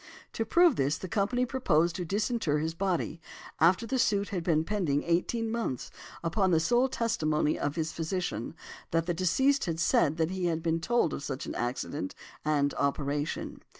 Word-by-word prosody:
To 225 - -1
prove 340 +4 +4
this, 140 +3 +1
the 185 - -6
company 220 +7 +1
proposed 175 - +1
to 180 - -3
disinter 210 - 0
his 160 +2 -1
body, 170 -3 -2 0.4
after 180 +8 +4
the 255 +3 -1
suit 205 -3 +2
had 180 -4 -3
been 160 -2 +2
pending 165 -7 0
eighteen 220 +7 0
months, 225 - -3 0.3
upon 185 +3 +1
the 165 -3 +4
sole 240 +10 +3
testimony 155 -12 0
of 145 +1 -1
his 160 -1 -1
physician, 170 +1 -3 0.3
that 165 0 +1
the 175 - 0
deceased 265 +11 +2
had 165 -2 -2
said 160 -2 +3
that 160 +1 +1
he 185 -1 -2
had 165 -2 0
been 165 0 +1
told 235 -2 +1
of - - -4
such 140 0 -4
an - - -5
accident 120 -3 -3 0.3
and 145 -2 +1
operation. 145 +1 -2
170 Hz, 180 wpm, -29 LUFS, 155-215 Hz, 0.4 s, prove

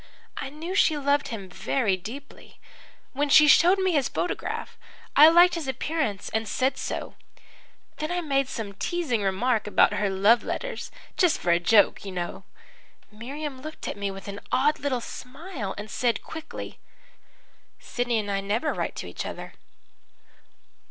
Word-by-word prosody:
I 270 - -5
knew 320 +6 -6
she 320 -5 +3
loved 285 0 +1
him 205 -5 -6
very 200 +3 0
deeply. 240 +10 -10 0.5
When 285 +2 0
she 300 +2 +8
showed 350 +6 +6
me 375 -1 +1
his 290 -6 +1
photograph, 355 - -3 0.4
I 300 +2 +10
liked 350 +2 +6
his 330 -5 -3
appearance 265 -6 -2
and 220 0 -2
said 260 +4 0
so. - - -4 0.8
Then 310 - -3
I 355 - 0
made 275 -5 0
some 210 -3 -5
teasing 270 - -1
remark 210 +4 0
about 210 - +4
her 205 - 0
love 200 +5 +4
letters - - -4 0.3
just 355 -4 +4
for 175 - 0
a 170 - +4
joke, 205 +4 +4
you 195 - -6
know. 175 -1 -5 0.7
Miriam 265 +5 -6
looked 310 +2 -8
at - - -3
me 200 -1 -3
with 195 0 -8
an 200 0 -6
odd 295 +4 +2
little 260 -4 -1
smile 255 - -7
and 205 +1 -6
said 240 -2 0
quickly: 320 0 -8 1.0
"'Sidney 245 -1 -2
and 205 -2 -2
I 195 0 0
never 220 +10 -1
write - - -3
to - - -6
each - - -5
other.' - - -7
255 Hz, 160 wpm, -26 LUFS, 205-305 Hz, 1.0 s, I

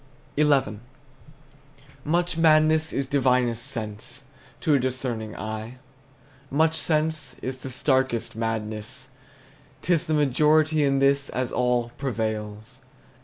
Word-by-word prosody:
XI. 140 -8 +2 1.2
Much 175 +3 0
madness 155 -1 +4
is 135 - -1
divinest 125 -4 +1
sense 120 0 -4 0.4
To 155 - +2
a 140 - +4
discerning 120 -4 -3
eye; 110 +3 -6 0.7
Much 160 +3 +2
sense 155 -5 0
the 130 0 -6
starkest 130 -3 0
madness. 110 -1 -4 0.7
'T 180 - +2
is 170 +1 0
the 155 - +1
majority 150 +2 +3
In 135 -1 +2
this, 140 0 +2
as 130 -1 -2
all, 125 -1 +1
prevails. 110 -1 -4
130 Hz, 110 wpm, -25 LUFS, 115-150 Hz, 1.2 s, madness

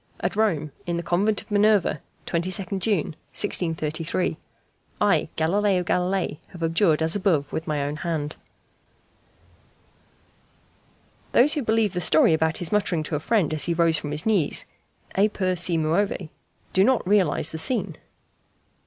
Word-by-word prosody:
At - - -2
Rome, 170 -9 0 0.2
in 170 -1 -1
the 170 - -3
Convent 200 +5 +1
of - - -24
Minerva, 205 -6 +3 0.2
22nd 185 +3 -1
June, 190 -6 0 0.2
1633. 165 -2 -1 0.6
I, 185 -7 +2
Galileo 185 +3 +1
Galilei, 180 -2 -1
have 175 -3 -9
abjured 165 -1 +2
as 160 +3 +2
above 170 -8 0
with 160 - -4
my 150 -2 -1
own 145 +1 -3
hand." 155 -3 -3 3.0
Those 275 +5 +5
who 295 - -1
believe 220 -4 +1
the 180 - -2
story 160 0 +4
about 160 0 +1
his 175 - -2
muttering 195 -6 +1
to 150 - -3
a - - -1
friend, 185 -2 +1
as 150 -2 +1
he 170 - 0
rose 165 -2 +3
from 150 - -6
his 150 +1 0
knees, 200 -9 +1 0.5
"e 205 +2 +3
pur 185 -3 -1
si 175 -1 +1
muove," 165 +2 0 0.4
do 190 - +4
not 255 -3 +2
realize 195 -6 +2
the 160 - -4
scene. 200 -4 -2
175 Hz, 150 wpm, -24 LUFS, 160-205 Hz, 3.0 s, Those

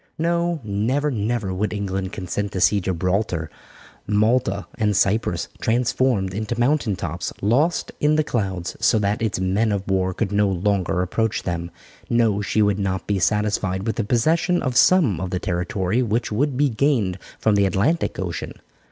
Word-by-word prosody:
No, 170 0 0
never, 115 +8 0
never 110 -3 -1
would 105 +3 -1
England 95 -2 -3
consent 100 +2 -4
to 95 - -2
see 100 +2 +3
Gibralter, 90 -2 -1 0.6
Malta, 105 0 +1
and 105 -3 0
Cyprus 100 -5 +1
transformed 115 -4 +1
into 110 +3 -3
mountain 120 -4 +2
tops, 85 -1 -4
lost 140 - +1
in 150 +1 +3
the 155 - +3
clouds, 95 - -3
so - - +3
that 105 +1 0
its 110 -3 -1
men 100 +4 +1
of 100 -1 -2
war 95 -1 0
could 100 -2 -1
no 105 0 +3
longer 95 -1 0
approach 110 +4 -1
them. 85 -1 -3 0.4
No, 115 -4 +2
she 105 +1 +1
would 105 -1 +1
not 95 -1 -2
be 100 -2 0
satisfied 105 -1 0
with 110 - -2
the 115 - +1
possession 160 - +1
of 130 -1 -1
some 140 - +4
of 95 - -3
the 90 - -2
territory 95 +4 -1
which 115 -1 -1
would 130 +4 0
be 145 +1 +3
gained 115 -7 +1 0.2
from 110 - +2
the 100 -1 +3
Atlantic 100 - 0
Ocean. 85 -3 -4
105 Hz, 170 wpm, -22 LUFS, 95-120 Hz, 0.6 s, some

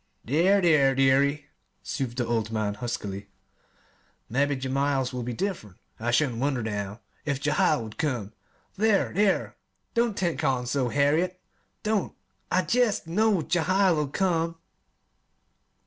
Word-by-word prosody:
"There, 175 - +3
there, 145 -6 +4
dearie," 140 +2 +3 0.4
soothed 130 -4 -4
the 125 - 0
old 115 -2 -1
man 110 -2 -1
huskily; 100 -3 -5 1.0
"mebbe 140 +3 +1
Jehiel's 135 0 0
will 125 - -3
be 120 +1 -4
diff'rent. 120 - -4 0.2
I 115 +2 -2
shouldn't 120 -1 +1
wonder, 135 -3 0
now, 105 0 -4 0.2
if 140 -3 -1
Jehiel 150 -2 +2
would 110 -1 -10
come. 120 -9 -2 0.4
There, 210 0 +2
there! 200 +1 +1 0.4
don't 235 -3 +1
take 175 -3 -1
on 125 -2 +1
so, 125 0 0
Harriet! 155 +7 +1 0.4
don't! 215 -2 -1 0.3
I 185 +1 +2
jest 240 -6 +1
know 195 +1 +2
Jehiel'll 175 -1 +2
come." 165 +1 0
140 Hz, 130 wpm, -26 LUFS, 120-175 Hz, 1.0 s, there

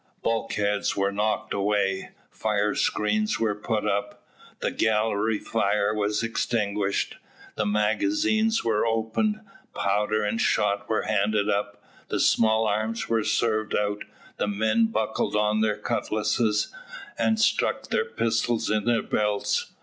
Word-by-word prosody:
Bulkheads 105 -3 0
were 100 0 +1
knocked 105 +1 -1
away, 100 -1 0 0.2
firescreens 110 - 0
were 110 -2 +1
put 105 +1 -2
up, 100 0 -2 0.3
the - - -1
gallery 110 0 +1
fire 105 -1 0
was 105 +1 0
extinguished, 105 -3 -1 0.4
the 105 - -1
magazines 225 - +1
were 110 -2 +1
opened, 115 - 0 0.3
powder 105 +2 +1
and 110 +2 -1
shot 100 -1 +1
were 110 - +1
handed 105 0 +1
up, 100 0 -2 0.2
the - - -2
small 110 0 +3
arms 110 +2 -1
were 115 -1 +2
served 110 -1 0
out, 105 0 -1 0.3
the - - 0
men 110 +2 +2
buckled 110 -1 -1
on 105 +1 +2
their 110 -1 +1
cutlasses, 105 +1 0 0.5
and 220 0 +2
stuck - - +1
their 465 - +1
pistols 115 - 0
in 105 -1 0
their 120 -1 +2
belts. 105 - 0
105 Hz, 125 wpm, -26 LUFS, 105-115 Hz, 0.5 s, small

